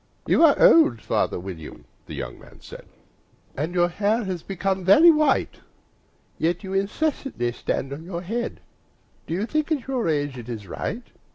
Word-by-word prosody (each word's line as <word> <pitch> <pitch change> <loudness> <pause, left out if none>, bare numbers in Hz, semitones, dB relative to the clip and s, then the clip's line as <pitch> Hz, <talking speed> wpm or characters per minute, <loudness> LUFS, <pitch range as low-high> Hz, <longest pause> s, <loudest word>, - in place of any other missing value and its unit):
"YOU - - +3
are 305 -3 +7
old, 155 -8 +6
father 95 - -1
William," 85 -4 -9 0.2
the - - -7
young - - -6
man - - -16
said, - - -12 0.7
"And 160 +6 -3
your 175 -1 +4
hair 210 +6 0
has 185 -4 -4
become 190 +1 -2
very 300 - +7
white; 305 -3 +1
And - - -25 0.8
yet 170 +4 0
you 190 0 -6
incessantly 200 - -1
stand 135 +3 -3
on 150 +3 -8
your 175 0 -6
head 230 +6 -4 0.7
Do 165 - -2
you 200 +4 -1
think, 305 +5 -2
at 280 -6 -1
your 255 -6 -1
age, 145 -4 -1
it 120 0 -10
is 110 -4 -6
right? 220 - -5
185 Hz, 175 wpm, -24 LUFS, 145-240 Hz, 0.8 s, are